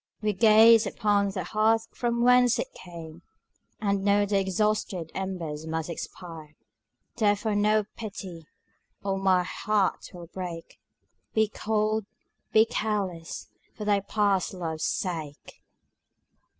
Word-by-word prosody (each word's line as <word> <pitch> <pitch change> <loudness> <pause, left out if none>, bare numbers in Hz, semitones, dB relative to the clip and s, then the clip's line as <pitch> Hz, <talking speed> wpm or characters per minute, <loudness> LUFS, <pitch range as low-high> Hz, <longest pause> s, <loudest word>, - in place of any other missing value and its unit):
We 210 -1 0
gaze 225 +2 +6
upon 205 -2 +1
the 190 -2 -4
hearth 220 +4 +2
from 235 -1 -1
whence 250 -1 +5
it - - -4
came, 170 -2 -10 0.6
And 200 -2 0
know 205 0 +3
the 200 -1 +1
exhausted 190 -3 -1
embers 165 -5 -4
must 160 +1 -3
expire: 160 -2 -8 0.6
Therefore 210 0 +2
no 210 +1 +3
pity, 190 -7 -8 0.6
or 195 -1 -1
my 185 -2 +3
heart 205 +1 -1
will 175 -1 -10
break; 175 -1 -7 0.6
Be 220 0 +4
cold, 215 -1 -1 0.4
be 220 +1 +6
careless 200 -7 -3 0.3
for 210 - -6
thy 205 -1 +3
past 200 -2 0
love's 160 -3 -3
sake! 160 -6 -4
200 Hz, 120 wpm, -27 LUFS, 175-215 Hz, 0.6 s, gaze